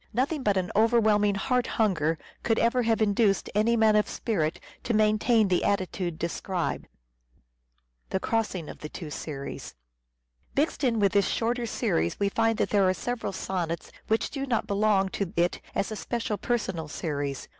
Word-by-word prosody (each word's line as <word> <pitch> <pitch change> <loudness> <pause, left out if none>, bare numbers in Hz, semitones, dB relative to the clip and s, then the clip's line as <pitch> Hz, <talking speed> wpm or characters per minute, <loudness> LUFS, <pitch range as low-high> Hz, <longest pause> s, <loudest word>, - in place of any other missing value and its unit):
Nothing 280 +5 0
but 205 -5 +2
an 185 -1 -1
overwhelming 215 -2 +4
heart 250 +5 0
hunger 165 -7 +2 0.2
could 225 - +1
ever 235 +2 +2
have 225 -1 +2
induced 205 -1 +2
any 220 +3 +3
man 220 -1 +5
of 210 - +2
spirit 165 -9 -1 0.2
to 235 - 0
maintain 215 +1 +3
the 180 -2 +1
attitude 185 -4 -1
described. 170 +1 -3 1.2
Mixed 225 +2 0
in 170 -4 -4
with - - -9 2.3
this 200 -1 +3
shorter 235 +1 -1
series 85 - 0
we 200 - +2
find 225 +2 +1
that - - 0
there 205 - +4
The - - +4
crossing 185 0 +1
are - - -10
several 230 - -4
sonnets 175 -4 -3 0.2
which 220 0 +1
do 275 -1 -3
not 235 -4 0
belong 200 -1 +2
to 190 -2 -3
it 175 +1 +1
as 195 - -1
a - - -3
special 225 -1 -3
seriese - - -12
personal 190 -10 -1
series. 145 -3 -3
210 Hz, 155 wpm, -27 LUFS, 185-225 Hz, 2.3 s, man